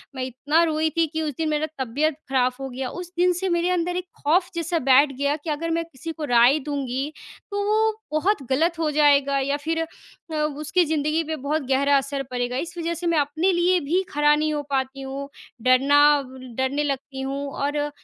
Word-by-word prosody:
मैं 260 Hz, -, -3 dB
इतना 285 Hz, +6 st, +1 dB
रोई 315 Hz, -1 st, +1 dB
थी 330 Hz, -, +4 dB
कि 320 Hz, +1 st, -4 dB
उस 305 Hz, -2 st, -2 dB
दिन 320 Hz, -1 st, -1 dB
मेरा 300 Hz, 0 st, 0 dB
तबीयत 280 Hz, +5 st, 0 dB
खराब 255 Hz, 0 st, +1 dB
हो 270 Hz, -, -5 dB
गया। 255 Hz, 0 st, -4 dB
उस 355 Hz, 0 st, -8 dB
दिन 360 Hz, 0 st, +4 dB
से 380 Hz, 0 st, -1 dB
मेरे 345 Hz, +1 st, +1 dB
अंदर 355 Hz, 0 st, 0 dB
एक 365 Hz, -, -3 dB, 0.2 s
खौफ़ 350 Hz, +5 st, +3 dB
जैसा 335 Hz, 0 st, -1 dB
बैठ 275 Hz, +2 st, +6 dB
गया 285 Hz, +1 st, +1 dB
कि 325 Hz, -, -5 dB
अगर 310 Hz, +3 st, -2 dB
मैं 335 Hz, 0 st, 0 dB
किसी 325 Hz, +1 st, -8 dB
को 315 Hz, -1 st, -5 dB
राय 245 Hz, +5 st, +6 dB
दूँगी, 275 Hz, 0 st, -3 dB, 0.4 s
तो 405 Hz, 0 st, -1 dB
वो 440 Hz, +1 st, +3 dB, 0.2 s
बहुत 310 Hz, +1 st, +1 dB
गलत 330 Hz, +5 st, +1 dB
हो 315 Hz, -, +1 dB
जाएगा 285 Hz, -2 st, +4 dB
या 280 Hz, +1 st, 0 dB
फिर 325 Hz, 0 st, +1 dB
अ, 325 Hz, 0 st, -10 dB
उसकी 305 Hz, +3 st, 0 dB
ज़िंदगी 305 Hz, +1 st, 0 dB
पे 315 Hz, 0 st, -3 dB
बहुत 295 Hz, +2 st, -2 dB
गहरा 280 Hz, +1 st, +3 dB
असर 275 Hz, 0 st, -2 dB
पड़ेगा। 245 Hz, 0 st, -2 dB
इस 340 Hz, +5 st, -5 dB
वजह 335 Hz, 0 st, -2 dB
से 340 Hz, +1 st, -4 dB
मैं 335 Hz, -2 st, +2 dB
अपने 310 Hz, +6 st, +1 dB
लिए 355 Hz, +1 st, +3 dB
भी 360 Hz, +4 st, +3 dB
खड़ा 295 Hz, 0 st, +4 dB
नहीं 305 Hz, 0 st, 0 dB
हो 295 Hz, -, -1 dB
पाती 270 Hz, 0 st, -2 dB
हूँ, 275 Hz, +1 st, -6 dB, 0.3 s
डरना 265 Hz, +4 st, +4 dB, 0.3 s
व 260 Hz, -, -12 dB, 0.2 s
डरने 265 Hz, +3 st, 0 dB
लगती 275 Hz, -1 st, -4 dB
हूँ 275 Hz, +1 st, -3 dB
और 285 Hz, +1 st, -2 dB
अ, 295 Hz, 0 st, -1 dB
295 Hz, 215 wpm, -23 LUFS, 275-330 Hz, 0.4 s, बैठ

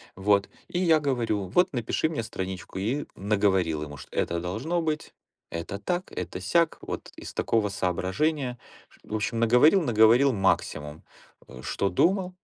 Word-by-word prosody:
Вот, 100 Hz, +1 st, +2 dB, 0.2 s
и 175 Hz, -, -1 dB
я 165 Hz, -4 st, +4 dB
говорю: 115 Hz, -8 st, -1 dB
"Вот 180 Hz, -, +2 dB
напиши 120 Hz, +5 st, 0 dB
мне 150 Hz, -8 st, -2 dB
страничку". 95 Hz, -3 st, -6 dB
И 125 Hz, +9 st, -1 dB
наговорил 95 Hz, -6 st, +1 dB
ему, 75 Hz, -1 st, -8 dB
что -, -, -12 dB
это 85 Hz, 0 st, 0 dB
должно 120 Hz, -, -2 dB
быть, 155 Hz, -1 st, -3 dB, 0.4 s
это 85 Hz, +4 st, -5 dB
так, 175 Hz, -, -3 dB
это -, -, -5 dB
сяк, 170 Hz, -2 st, +2 dB
вот -, -, -6 dB
из -, -, -8 dB
такого 110 Hz, -2 st, +1 dB
соображения, 120 Hz, -, -1 dB, 0.5 s
в 110 Hz, -, -5 dB
общем, 115 Hz, +2 st, -1 dB
наговорил 125 Hz, -, +5 dB
наговорил 120 Hz, +1 st, +5 dB
максимум, 80 Hz, -6 st, -1 dB, 0.4 s
э, 65 Hz, -, -11 dB
что 100 Hz, -, -1 dB
думал. 185 Hz, -, +2 dB
110 Hz, 150 wpm, -27 LUFS, 95-150 Hz, 0.5 s, наговорил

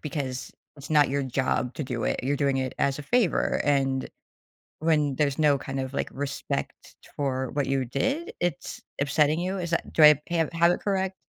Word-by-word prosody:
because 135 Hz, -4 st, -4 dB, 0.2 s
it's 140 Hz, +1 st, -11 dB
not 150 Hz, -2 st, +5 dB
your 140 Hz, +1 st, -1 dB
job 130 Hz, -1 st, -1 dB
to -, -, -3 dB
do 125 Hz, -4 st, -3 dB
it, -, -, 0 dB
you're 140 Hz, +3 st, 0 dB
doing 140 Hz, -2 st, +1 dB
it 130 Hz, -1 st, -2 dB
as 140 Hz, 0 st, +1 dB
a -, -, -7 dB
favor, 220 Hz, +4 st, +1 dB
and, 135 Hz, -2 st, +1 dB, 0.7 s
when 150 Hz, -3 st, +2 dB
there's 140 Hz, -2 st, 0 dB
no 150 Hz, -2 st, +4 dB
kind 135 Hz, 0 st, -4 dB
of, 130 Hz, 0 st, -5 dB
like, -, -, -2 dB
respect 140 Hz, +1 st, -5 dB, 0.2 s
for 130 Hz, -2 st, -1 dB
what 145 Hz, -1 st, 0 dB
you 135 Hz, -1 st, 0 dB
did, 275 Hz, -, -2 dB
it's 175 Hz, -5 st, -3 dB, 0.2 s
upsetting 150 Hz, +2 st, +2 dB
you? 185 Hz, +2 st, -2 dB
Is 175 Hz, -3 st, -4 dB
that 165 Hz, -, -1 dB
do 160 Hz, -, +3 dB
I 150 Hz, -1 st, +8 dB
have 165 Hz, -3 st, 0 dB
have 170 Hz, +1 st, +4 dB
it -, -, -3 dB
correct? 190 Hz, -1 st, -1 dB
145 Hz, 195 wpm, -26 LUFS, 135-165 Hz, 0.7 s, I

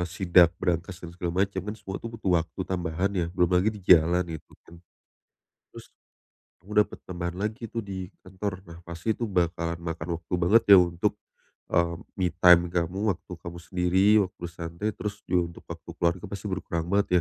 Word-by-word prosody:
sidak 90 Hz, -1 st, +5 dB
brankas 90 Hz, +1 st, -2 dB
dan 85 Hz, -1 st, -10 dB
segala 90 Hz, +2 st, 0 dB
macam, 100 Hz, -1 st, -5 dB
kan 105 Hz, -, -3 dB
semua 100 Hz, -2 st, -7 dB
itu 115 Hz, -, -6 dB
butuh 95 Hz, -7 st, +1 dB
waktu 80 Hz, +3 st, -8 dB
tambahan 90 Hz, +1 st, -1 dB
ya, 90 Hz, -3 st, 0 dB
belum 90 Hz, 0 st, +2 dB
lagi 90 Hz, +4 st, +4 dB
di 105 Hz, -4 st, -6 dB
jalan, 90 Hz, +1 st, +5 dB
gitu 80 Hz, -, -10 dB
kan. 85 Hz, 0 st, -15 dB, 0.9 s
Terus -, -, -12 dB, 0.7 s
kamu 95 Hz, +5 st, -16 dB
dapat -, -, -11 dB
tambahan 85 Hz, -1 st, -4 dB
lagi 110 Hz, +3 st, -3 dB
itu 115 Hz, -, -2 dB
di 95 Hz, -1 st, -6 dB
kantor. 95 Hz, 0 st, -5 dB
Nah, 85 Hz, 0 st, -11 dB
pasti 85 Hz, +6 st, -3 dB
itu 120 Hz, -, -4 dB
bakalan 85 Hz, -3 st, -1 dB
makan 85 Hz, -1 st, -5 dB
waktu 85 Hz, -, -10 dB
banget 110 Hz, +6 st, +5 dB
ya -, -, +9 dB
untuk, 85 Hz, -1 st, +1 dB, 0.6 s
eee, 85 Hz, 0 st, +2 dB, 0.2 s
me 90 Hz, -, +2 dB
time 90 Hz, -1 st, +7 dB
kamu, 90 Hz, +2 st, -1 dB, 0.2 s
waktu 90 Hz, -, -19 dB
kamu 85 Hz, 0 st, -7 dB
sendiri, 90 Hz, +2 st, +1 dB, 0.2 s
waktu 90 Hz, -, -18 dB
santai 85 Hz, +5 st, -4 dB
terus 105 Hz, -1 st, -5 dB
juga 90 Hz, -1 st, +2 dB, 0.2 s
untuk -, -, -22 dB
waktu -, -, -10 dB
keluarga 85 Hz, +1 st, +1 dB
pasti 100 Hz, +1 st, -6 dB
berkurang 85 Hz, -3 st, -3 dB
banget 100 Hz, 0 st, +2 dB
90 Hz, 180 wpm, -27 LUFS, 85-95 Hz, 0.9 s, ya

